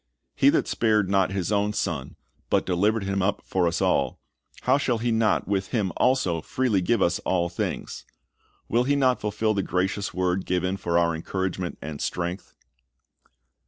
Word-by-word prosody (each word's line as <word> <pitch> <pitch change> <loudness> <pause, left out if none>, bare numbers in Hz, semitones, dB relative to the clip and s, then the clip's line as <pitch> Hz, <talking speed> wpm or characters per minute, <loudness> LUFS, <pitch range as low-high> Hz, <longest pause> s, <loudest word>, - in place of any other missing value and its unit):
"He - - +5
that - - +2
spared 105 -4 +1
not 95 -1 +3
His 95 0 -2
own 105 0 +1
Son, 85 -10 -3 0.3
but - - +2
delivered 100 +4 +1
Him 100 0 -1
up 100 +2 0
for 90 -2 +1
us 85 0 0
all, - - +1 0.4
how 130 +3 +3
shall 125 -4 +1
He 115 +1 -1
not 110 -2 +2
with 95 -1 0
Him 105 -7 -1
also 110 -11 +2
freely 115 -1 0
give 100 +3 +2
us 85 0 +1
all 85 -2 0
things?"^ 90 - -4 0.6
Will 120 +2 +2
He 145 +2 +2
not 130 -3 +2
fulfil 105 +1 0
the 100 - 0
gracious 95 +2 -1
word 90 0 -1
given 90 +1 0
for 85 -3 -1
our 85 -1 +3
encouragement 90 +2 -3
and 75 -1 -6
strength? 90 +2 -4
95 Hz, 170 wpm, -25 LUFS, 90-110 Hz, 0.6 s, He